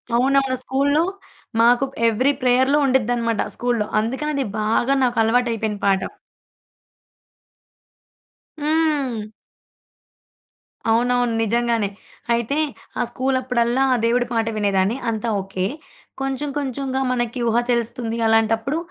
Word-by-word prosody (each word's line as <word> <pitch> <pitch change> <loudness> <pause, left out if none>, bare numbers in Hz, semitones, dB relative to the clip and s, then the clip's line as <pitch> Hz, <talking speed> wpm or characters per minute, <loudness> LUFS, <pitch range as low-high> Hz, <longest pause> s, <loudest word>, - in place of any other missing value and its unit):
అవునవును. 270 +1 +2
స్కూలులో 285 +5 +2 0.6
మాకు 245 +3 +4 0.2
ఎవ్రి 250 +5 +2
ప్రేయర్‌లో 260 +3 +3
ఉండిద్దనమాట 240 -3 +1
స్కూలులో. 240 -3 -1
అందుకని 265 +7 -2
అది 275 - 0
బాగా 225 +5 +1
నాకు 245 -1 0
అలవాటైపోయిన 225 -2 0
పాట. 190 -1 +1 2.5
హ్మ్. 290 -8 0 1.6
అవునవును. 245 +1 +2
నిజంగానే. 230 -1 +1 0.4
అయితే 235 +5 -1 0.4
ఆ - - +2
స్కూలు 260 +2 0
అప్పుడల్లా 250 0 +1
ఆ - - +3
దేవుడి 245 +1 +2
పాట 225 -1 0
వినేదాన్ని. 200 +2 +1
అంతా 225 +1 -2
ఓకే. 190 -1 -3 0.6
కొంచెం 270 +2 -2
కొంచెంగా 265 -1 -2
మనకి 240 0 -2
ఊహ 230 - +1
తెలుస్తుంది 235 -1 -1
అలాంటప్పుడు, 225 +5 +2
240 Hz, 100 wpm, -21 LUFS, 225-265 Hz, 2.5 s, మాకు